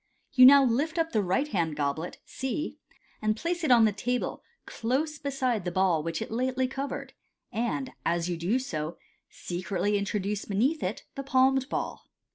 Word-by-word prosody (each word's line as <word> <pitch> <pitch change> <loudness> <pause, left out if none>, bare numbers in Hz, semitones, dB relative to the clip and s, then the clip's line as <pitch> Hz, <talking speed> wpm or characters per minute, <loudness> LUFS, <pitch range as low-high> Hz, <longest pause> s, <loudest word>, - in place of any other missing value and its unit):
You 255 -2 +9
now 280 +1 +9
lift 280 +7 +1
up 330 0 +1
the 215 - +2
right 195 +10 +1
hand 170 - -1
goblet 145 +3 -2
(C), 265 +4 -4 0.4
and 215 0 +1
place 345 +5 -2
it 310 - +1
on 235 -3 +7
the 215 - +3
table 245 +5 -2 0.2
close 280 +6 -2
beside 260 -7 -1
the 175 - -2
ball 180 -3 +2
which 165 +1 -3
it - - -10
lately 255 +2 0
covered, 270 +2 -5 0.4
and 240 +3 -2
as 170 0 0
you 175 - -1
do 175 +9 0
so, 165 -10 -4 0.3
secretly 190 +3 -2
introduce 200 0 -2
beneath 255 +11 +1
it 190 +4 -3
the 275 - -5
palmed 265 0 +3
ball. - - -4
230 Hz, 170 wpm, -28 LUFS, 185-270 Hz, 0.4 s, You